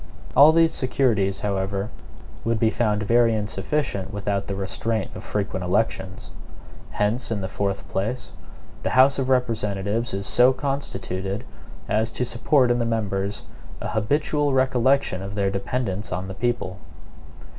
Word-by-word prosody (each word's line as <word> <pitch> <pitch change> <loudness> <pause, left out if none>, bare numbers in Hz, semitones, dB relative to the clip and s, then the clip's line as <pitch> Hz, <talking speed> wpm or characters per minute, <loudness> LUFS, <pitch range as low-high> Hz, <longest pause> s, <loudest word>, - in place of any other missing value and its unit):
All 145 +3 +9
these 165 0 +4
securities, 115 -7 +1
however, 100 +1 -2 0.5
would 115 -1 0
be 110 0 +3
found 105 -3 0
very 115 +1 +4
insufficient 105 0 -2
without 100 -1 -2
the 100 - -3
restraint 110 +3 -2
of - - -8
frequent 100 -2 -2
elections. 95 -1 -1 0.6
Hence, 105 +5 0
in 110 -3 -2
the 95 - -2
fourth 100 0 -2
place, 110 +6 -3 0.5
the - - -1
House 135 +2 +6
of 130 -1 -1
Representatives 115 -3 0
is 100 0 -3
so 125 +4 +5
constituted 100 -7 -3 0.4
as 110 +2 +1
to 120 +2 -2
support 125 +2 +3
in 120 - +2
the - - +1
members 105 -3 -1 0.4
an - - -4
habitual 145 +7 +1
recollection 130 -5 +2
of 100 +1 -6
their 100 -1 +1
dependence 100 0 -2
on 90 +4 -3
the 95 - -5
people. 110 -3 -2
110 Hz, 145 wpm, -24 LUFS, 100-125 Hz, 0.6 s, All